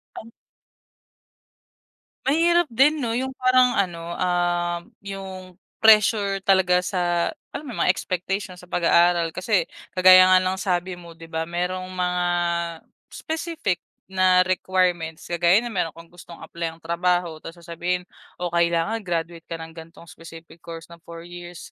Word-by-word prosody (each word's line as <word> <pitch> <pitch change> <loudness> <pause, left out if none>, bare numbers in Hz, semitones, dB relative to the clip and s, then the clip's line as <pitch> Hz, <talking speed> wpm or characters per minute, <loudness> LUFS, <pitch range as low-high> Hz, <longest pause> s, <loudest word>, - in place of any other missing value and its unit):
Tan 230 - -10 1.9
Mahirap 335 +3 +3
din 280 +6 +3
'no, 230 -2 -1
'yong 265 +1 -3
parang 255 -1 +3
ano, 170 -3 -2
um, 175 -1 0 0.2
'yong 190 -2 -8 0.2
pressure 210 -2 +5
talaga 190 -2 +4
sa, 175 -3 0 0.2
alam 305 - -7
mo 255 - -7
'yong, - - -3
mga - - +2
expectation 185 +1 -2
sa 180 0 -15
pag-aaral. 170 -1 +3
Kasi, 185 -2 0 0.3
kagaya 185 0 +8
nga 185 - +7
ng 185 0 +1
sabi 180 -1 -1
mo 170 -2 -12
'di 165 - -11
ba, 160 0 -4
merong 180 +1 -3
mga, 180 -1 -1 0.9
specific 320 - -3 0.3
na 185 -1 +4
requirements. 180 -3 -1
Kagaya 175 +3 +3
no'n 240 - -5
meron 180 -5 -1
kang 165 0 -13
gustong 175 -1 -13
apply-ang 165 0 -6
trabaho 170 -1 0
tas 165 - -9
sasabihin 175 +2 -3 0.4
o 180 - -1
kailangan 170 +5 +1
graduate 170 -2 -3
ka 165 - -5
ng 160 0 -8
gan'tong 165 0 -12
specific 165 0 -13
course 165 0 -9
na - - -10
four 170 0 -10
years. 175 0 -10
180 Hz, 145 wpm, -23 LUFS, 170-195 Hz, 1.9 s, kagaya